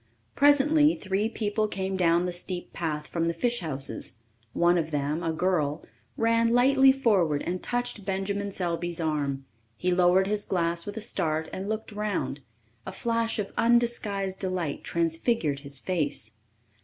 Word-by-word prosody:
Presently 295 +2 +5
three 200 +3 -1
people 215 -1 -1
came 190 -1 -3
down 175 -1 +3
the 180 - -2
steep 175 0 -3
path 150 -3 -3
from 165 +1 -2
the 170 0 -1
fish 240 +7 0
houses. 140 -7 -2 0.3
One 175 0 +3
of 160 -1 -2
them, 150 +2 -1
a 165 -2 -1
girl, 160 -3 0 0.3
ran 230 0 +2
lightly 265 +2 +6
forward 195 - +2
and 180 +1 -3
touched 245 -3 -3
Benjamin 200 +1 -2
Selby's 175 -2 -1
arm. 145 -4 -1 0.3
He 180 - 0
lowered 180 +1 +4
his 205 +1 0
glass 170 -1 -1
with 205 +2 -6
a - - -3
start 160 -5 -1
and 195 +2 -4
looked 220 0 -4
around. 205 -8 -2 0.4
A - - -6
flash 230 0 -1
of 205 -2 -3
undisguised 230 -5 +1
delight 185 -6 -3
transfigured 165 - 0
his 140 -1 -5
face. 145 - -2
185 Hz, 155 wpm, -27 LUFS, 165-220 Hz, 0.4 s, lightly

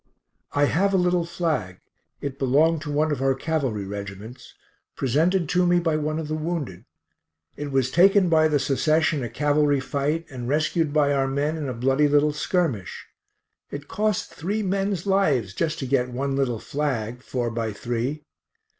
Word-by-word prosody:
I 145 0 +3
have 195 +7 +1
a - - +5
little 180 -1 +2
flag; 155 - -2 0.4
it 140 -1 -5
belonged 150 +5 +3
to 150 -1 -5
one 150 +2 +1
of 140 -3 -2
our 135 0 +2
cavalry 135 -9 -2
reg'ts; 100 +4 -8 0.4
presented 160 +7 +1
to 180 0 +2
me 175 0 +4
by 165 -2 0
one 155 0 -1
of 160 -2 -4
the 155 - -3
wounded. 155 - -4 0.7
It 145 -1 -5
was 130 -1 +1
taken 195 +2 +5
by 160 -2 +4
the 150 -1 +2
Secesh 155 +4 +2
in 145 - -2
a 120 - -4
cavalry 145 +3 +2
fight, 145 +4 -2
and 125 -2 -5
rescued 155 +1 +1
by 145 -1 +3
our 135 -1 +1
men 145 +3 -1
in 150 -4 -4
a - - -3
bloody 135 +5 +2
little 145 +1 +3
skirmish. 150 - -2 0.6
It 145 0 -7
cost 210 -2 -1
three 205 +7 -2
men's 195 -1 -1
lives, 150 - +1
just 165 +4 -1
to 135 - -4
get 125 -1 +1
one 135 +2 -2
little 130 -4 0
flag, 125 -3 -3
four 120 -2 -3
by 115 -1 -2
three. 120 +7 -3
145 Hz, 175 wpm, -24 LUFS, 130-160 Hz, 0.7 s, a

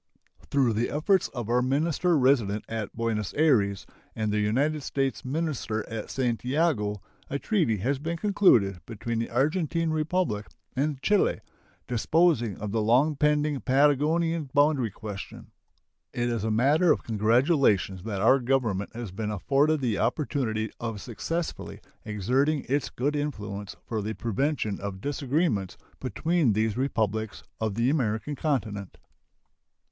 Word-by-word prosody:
Through 130 -5 +2
the 115 +3 0
efforts 185 +6 +2
of 120 -5 -6
our 120 +2 +2
minister 155 +6 +1
resident 120 -6 +2
at 110 -3 -4
Buenos 110 -3 -2
Ayres 110 -11 +2 0.3
and 110 -1 -1
the 105 - +1
United 140 +9 +1
States 135 -4 -2
minister 130 -7 -2
at 110 -1 -6
Santiago, 125 - 0 0.3
a 140 - -1
treaty 155 - +1
has 130 +8 -1
been 165 +3 -3
concluded 120 - +3
between 115 +1 -3
the 115 - -2
Argentine 165 +2 0
Republic 155 - -1 0.3
and 140 +1 -1
Chile, 205 -2 +2 0.5
disposing 120 - +2
of 105 -1 -5
the 110 +1 0
long 130 +8 +3
pending 150 -1 +1
Patagonian 150 +3 +2
boundary 145 -5 +3
question. 105 -1 -8 0.6
It 120 0 -1
is 115 -3 -2
a 110 - 0
matter 145 +10 +4
of - - +1
congratulation 115 - +2
that 100 -3 -3
our 135 - +5
Government 120 -6 -1
has 115 -5 -5
been 105 +3 -4
afforded 140 - +1
the 115 -5 0
opportunity 115 -3 -1
of 115 -3 -4
successfully 165 +10 -4 0.3
exerting 130 +8 0
its 140 +1 0
good 145 +4 -1
influence 105 -9 -4
for 110 -2 -2
the 110 +2 -4
prevention 115 -2 -1
of 100 -1 -5
disagreements 135 - -1 0.2
between 140 - +1
these 110 0 0
Republics 110 -5 -1 0.2
of 110 -3 -1
the 120 +4 +2
American 125 0 -1
continent. 110 - -2
125 Hz, 135 wpm, -27 LUFS, 110-150 Hz, 0.6 s, our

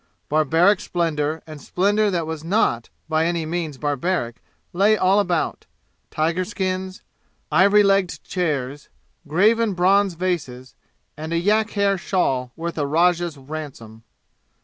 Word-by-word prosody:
Barbaric 160 +6 +3
splendor 160 -3 -2
and 155 -3 -10
splendor 205 +7 +1
that 175 -4 -1
was 160 -1 -6
not 165 - 0 0.2
by 160 0 +1
any 170 -2 -1
means 160 -3 -3
barbaric 145 -3 -2 0.4
lay 205 +4 +3
all 190 +1 +3
about 180 -5 -1 0.4
tiger 165 +4 0
skins, 185 -1 -4 0.5
ivory 200 +6 +5
legged 195 -2 +1
chairs, 145 -6 -3 0.4
graven 210 +6 +2
bronze 190 +1 +3
vases, 150 -8 -3 0.4
and 155 +2 -7
a 170 - +1
yak 210 +5 +2
hair 200 -1 +2
shawl 130 -10 -1
worth 165 0 -5
a 145 - 0
rajah's 170 +1 +1
ransom. 135 -6 -9
170 Hz, 125 wpm, -22 LUFS, 150-190 Hz, 0.5 s, ivory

